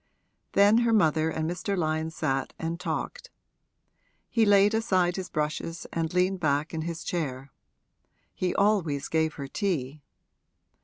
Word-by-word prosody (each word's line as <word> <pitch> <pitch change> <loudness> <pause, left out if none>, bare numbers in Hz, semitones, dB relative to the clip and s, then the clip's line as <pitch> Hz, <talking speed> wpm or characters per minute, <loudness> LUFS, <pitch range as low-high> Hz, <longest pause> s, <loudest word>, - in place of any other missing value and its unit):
Then 205 +3 +6
her 235 -1 +2
mother 160 -6 +3
and 160 0 -2
Mr. 185 +3 -2
Lyon 160 -1 0
sat 135 -4 -2
and 165 +1 -4
talked; - - -4 1.0
he 225 -2 +2
laid 205 +1 +5
aside 185 -6 +1
his 190 -1 -5
brushes 155 +2 -3
and 165 -1 -1
leaned 185 +1 +1
back 150 0 0
in 160 - -2
his 165 0 -5
chair; 135 -6 -3 0.8
he 180 -1 -2
always 190 -9 +1
gave 160 -1 0
her 140 -2 -6
tea. 150 - -2
165 Hz, 140 wpm, -27 LUFS, 155-195 Hz, 1.0 s, Then